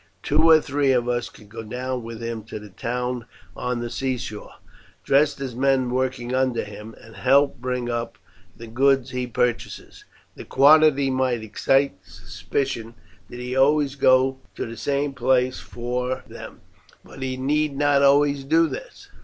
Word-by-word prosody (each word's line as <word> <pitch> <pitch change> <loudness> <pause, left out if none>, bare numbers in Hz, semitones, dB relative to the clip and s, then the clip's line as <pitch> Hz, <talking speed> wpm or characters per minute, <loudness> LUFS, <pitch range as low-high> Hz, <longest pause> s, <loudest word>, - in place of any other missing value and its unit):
Two 155 +3 +3
or 160 -1 +8
three 145 -2 0
of 120 -1 +1
us 120 0 -1
could 105 - -17
go 115 +2 -8
down 125 +3 -4
with 115 0 -8
him 115 -1 -4
to 110 - -7
the 105 -1 -11
town 125 +3 -3 0.3
on 125 -1 -3
the 120 - -4
seashore, 125 -5 -4 0.5
dressed 145 +1 +2
as 135 -3 -5
men 130 0 +1
working 125 -1 -2
under 130 -2 +1
him, 105 +2 -10
and 115 -2 -15
help 140 +5 +3
bring 125 -1 -2
up 115 -1 -3 0.4
the 115 - -9
goods 135 +2 +2
he 125 -1 -3
purchases. 125 -1 -3 0.3
The - - -10
quantity 140 -1 +5
might 130 -3 0
excite 135 +1 +1
suspicion 110 - -5 0.3
did 120 - -9
he 125 +1 -4
always 140 +1 +3
go 130 -1 +3 0.2
to - - -4
the 115 - -8
same 140 +2 -1
place 125 0 +1
for 125 +1 -4
them, - - -11 0.4
but - - -13
he 130 -1 -3
need 145 +2 0
not 145 -1 +3
always 140 0 +3
do 160 +4 +3
this. - - -9
130 Hz, 160 wpm, -23 LUFS, 120-140 Hz, 0.5 s, or